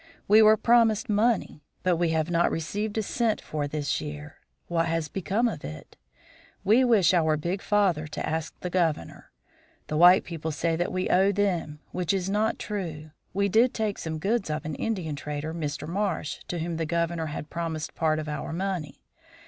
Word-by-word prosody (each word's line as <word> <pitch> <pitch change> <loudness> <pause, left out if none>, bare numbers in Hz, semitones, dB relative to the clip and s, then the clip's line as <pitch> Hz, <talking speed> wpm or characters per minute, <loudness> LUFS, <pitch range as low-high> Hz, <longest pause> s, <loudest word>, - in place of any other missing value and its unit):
We 215 +2 +7
were 215 0 +7
promised 230 0 +3
money, 215 -6 +1 0.2
but 180 -2 +2
we 170 0 +1
have 160 +1 0
not 170 0 +3
received 205 +7 -3
a 220 - +1
cent 230 +1 0
for 150 -2 -3
this 145 -1 -2
year. 75 0 -7 0.3
What 165 -1 +1
has 165 -1 -1
become 195 +8 0
of 160 -10 -4
it? 75 +1 -9 0.7
We 225 +6 +5
wish 220 -8 +4
our 160 -3 +3
big 175 +6 -3
father 190 -7 +1
to 150 - -4
ask 160 -1 -3
the 180 - -4
Governor. 165 - -1 0.6
The 150 - -1
white 180 +3 +7
people 160 -2 -5
say 165 +2 0
that 175 +2 -1
we 185 0 -1
owe 190 +2 +4
them, 175 -7 -1
which 180 +1 0
is 190 0 -2
not 215 +2 +1
true. 160 -7 -5 0.2
We 200 +2 +1
did 230 +5 +3
take 215 -3 -1
some 160 -1 -4
goods 200 +3 0
of 150 0 -3
an 155 - -3
Indian 175 -4 -2
trader, 150 +2 -4
Mr. 150 -2 -4
Marsh, 185 -3 -2
to 175 - -3
whom 165 0 -3
the 165 -1 -2
Governor 170 -1 -1
had 150 0 -6
promised 165 -2 -3
part 155 -1 +1
of 155 0 -4
our 150 +1 -4
money. 175 -4 -4
170 Hz, 190 wpm, -27 LUFS, 155-200 Hz, 0.7 s, We